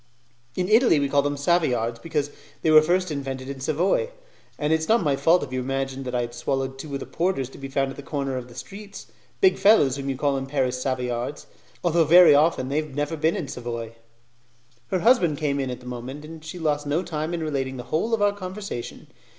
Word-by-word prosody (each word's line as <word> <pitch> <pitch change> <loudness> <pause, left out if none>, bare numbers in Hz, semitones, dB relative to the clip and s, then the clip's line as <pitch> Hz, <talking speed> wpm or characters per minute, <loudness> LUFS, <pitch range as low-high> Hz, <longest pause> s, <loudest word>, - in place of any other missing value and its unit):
"In 180 - -1
Italy, 220 - +5
we 140 - +1
call 140 +1 +3
them 145 0 -2
'Savoyards' 125 -8 +1
because 150 -2 -2 0.3
they 160 - +3
were 155 0 +9
first 180 +2 +1
invented 135 -2 -4
in 140 -1 -6
Savoy; 170 - +1 0.5
and 150 +1 +1
it 160 - +3
is 160 - -5
not 230 +1 +4
my 145 -3 +2
fault 165 +5 +3
if 130 -3 -7
you 130 - -1
imagined 135 +1 -3
that 125 -1 -3
I 120 - +1
had 120 0 -5
swallowed 135 +2 -2
two 140 0 -6
of - - -3
the - - -6
porters 165 -7 -1
to - - -12
be 135 - -6
found 135 0 -1
at 135 - -11
the - - -6
corner 140 -2 -3
of 125 -1 -5
the 120 - -15
streets 200 +7 -9 0.4
big 380 -2 +4
fellows 145 - +5
whom 140 0 -4
you 135 - -2
call 140 0 +1
in 135 0 -4
Paris 130 -2 -1
Savoyards, 125 +1 -3 0.4
although 170 -1 +3
very 165 0 +8
often 145 -3 +3
they 140 - -1
have 155 -3 -3
never 145 +2 -1
been 160 +1 +1
in 150 - -3
Savoy." 115 -3 -5 0.9
Her 185 - -1
husband 195 - +4
came 140 -2 -1
in 135 -1 -2
at 125 0 -6
that - - -15
moment, 125 +4 -7
and 160 0 -10
she 160 +3 -7
lost 150 -3 -1
no 155 +5 0
time 155 -1 -3
in 165 - -3
relating 135 -4 -2
the 125 - -6
whole 225 +9 +2
of 210 - -1
our 205 0 +3
conversation. 190 - -7
145 Hz, 230 wpm, -24 LUFS, 135-165 Hz, 0.9 s, were